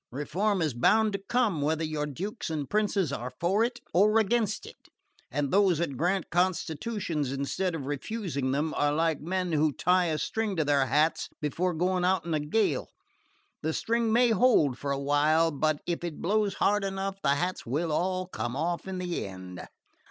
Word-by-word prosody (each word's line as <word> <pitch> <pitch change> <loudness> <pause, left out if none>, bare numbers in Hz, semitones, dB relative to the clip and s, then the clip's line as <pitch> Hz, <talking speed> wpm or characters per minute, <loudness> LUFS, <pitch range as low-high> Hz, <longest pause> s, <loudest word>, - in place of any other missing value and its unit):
Reform 185 - -1
is 155 -4 0
bound 215 - +3
to 200 - -2
come, 225 -11 +1
whether 155 +2 0
your 155 -1 -2
Dukes 190 - -5
and 150 -4 -3
Princes 200 -7 0
are 125 -1 -4
for 195 +6 +2
it 240 0 -2
or 210 +5 +4
against 215 -1 +1
it; - - -14 0.4
and 140 +2 -2
those 190 -3 +4
that 160 -4 -2
grant 180 +6 0
constitutions 175 - -1
instead 140 +6 -2
of 145 -5 -5
refusing 145 - -3
them 150 +3 0
are 145 0 +1
like 160 0 0
men 180 +2 -2
who 155 -1 +2
tie 180 +5 +2
a 160 -2 0
string 220 +5 -2
to 160 -3 0
their 140 -2 +2
hats 150 +5 +1
before 165 +4 -1
going 180 +2 0
out 185 -1 +2
in 170 - -2
a 155 - +1
gale. 150 0 0 0.7
The 160 +1 -1
string 230 +3 0
may 240 +1 +4
hold 220 - +4
for 140 +3 -5
a 140 - 0
while 150 +4 +3
but 155 +1 0
if 170 0 -3
it 170 -4 -5
blows 205 +1 +1
hard 205 0 +2
enough 195 0 -3
the 140 -1 +3
hats 180 +5 -2
will 155 +7 -1
all 185 +3 0
come 120 - -4
off 170 +5 -2
in 190 -1 -4
the 180 - -3
end." 95 -2 -9
170 Hz, 190 wpm, -28 LUFS, 145-195 Hz, 0.7 s, or